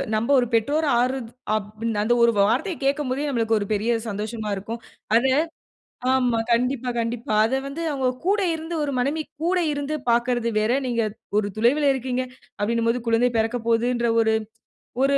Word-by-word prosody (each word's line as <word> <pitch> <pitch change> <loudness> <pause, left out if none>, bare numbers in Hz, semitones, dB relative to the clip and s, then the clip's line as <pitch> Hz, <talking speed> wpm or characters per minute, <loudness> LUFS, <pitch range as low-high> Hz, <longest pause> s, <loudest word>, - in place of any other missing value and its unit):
நம்ப 220 +3 -1
ஒரு 245 - +1
பெற்றோரா 290 +7 +2
ஆறத் 250 -2 -1 0.2
அப் 210 -1 -1 0.3
அந்த 220 +3 +2
ஒரு 235 - +6
வார்த்தையை 240 - +2
கேட்கும் 280 0 0
போதே 275 +3 -1
நமக்கு 230 -4 +1
ஒரு 205 - -2
பெரிய 215 +3 0 0.2
சந்தோஷமா 215 +1 -4
இருக்கும். 220 +4 -6 0.4
அத 240 +3 +4 0.9
ஆமா. 250 -3 +2
கண்டிப்பா, 250 +1 +1
கண்டிப்பா. 230 -1 -3
அத 230 +4 0
வந்து 280 +4 -5
அவங்க 265 -2 0 0.2
கூட 405 +2 +3
இருந்து 325 +1 -5
ஒரு 280 -2 -2
மனைவி 290 +5 0 0.2
கூட 365 +2 +2
இருந்து 285 +1 -2
பார்க்கறது 240 0 +1
வேற. 215 +2 +1 0.2
நீங்க 235 -2 0 0.4
ஒரு 205 -1 0
துலைவில 280 +6 +3
இருக்கீங்க 255 0 -2 0.4
அப்டின்னும் 230 +2 +1
போது 250 +2 -1
குழந்தை 230 +2 +3
பிறக்க 225 +2 0
போதுன்ற 235 +1 +2
ஒரு 220 0 +2 0.7
ஒரு 275 +1 +3
240 Hz, 160 wpm, -23 LUFS, 225-275 Hz, 0.9 s, ஒரு